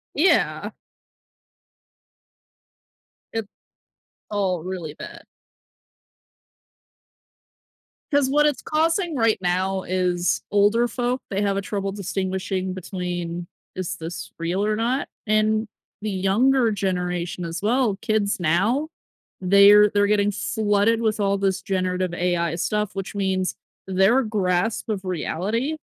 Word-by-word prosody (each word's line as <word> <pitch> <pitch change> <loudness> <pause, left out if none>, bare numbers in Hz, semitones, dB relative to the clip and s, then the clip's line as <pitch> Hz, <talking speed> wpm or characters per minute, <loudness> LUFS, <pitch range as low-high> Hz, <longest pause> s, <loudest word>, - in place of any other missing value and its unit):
Yeah. 335 +7 +2 2.6
It 225 -2 -2 0.8
all 190 -5 0
really 180 -5 -5
bad. 335 - -10 2.9
'Cause 285 -2 +3
what 295 +2 +4
it's 290 -3 0
causing 330 +2 +1
right 225 -4 +2
now 185 +1 0
is 180 -1 0
older 205 +4 +3
folk, 245 +1 -2
they 195 - -1
have 200 -1 +1
a - - +1
trouble 195 -1 -3
distinguishing 190 -1 -2
between, 175 -2 -4 0.3
"Is 185 -2 -4
this 165 +2 -7
real 175 +4 -1
or 215 0 +1
not?" 245 +5 -1 0.2
And 215 +1 +2 0.3
the 215 - -2
younger 225 +6 +3
generation 180 -3 -2
as 170 +2 -5
well, 230 -1 +2
kids 210 -1 0
now, 200 - +1 0.5
they're 200 +2 +7
they're 205 0 +3
getting 205 0 +2
flooded 210 +2 +1
with 220 -2 0
all 200 0 +1
this 195 -1 0
generative 185 -2 -1
AI 175 -2 0
stuff, 210 +3 -1
which 195 0 -5
means 190 -2 -1 0.3
their 195 +7 +3
grasp 205 -1 0
of 205 -3 -3
reality 200 - -2
200 Hz, 115 wpm, -23 LUFS, 185-220 Hz, 2.9 s, they're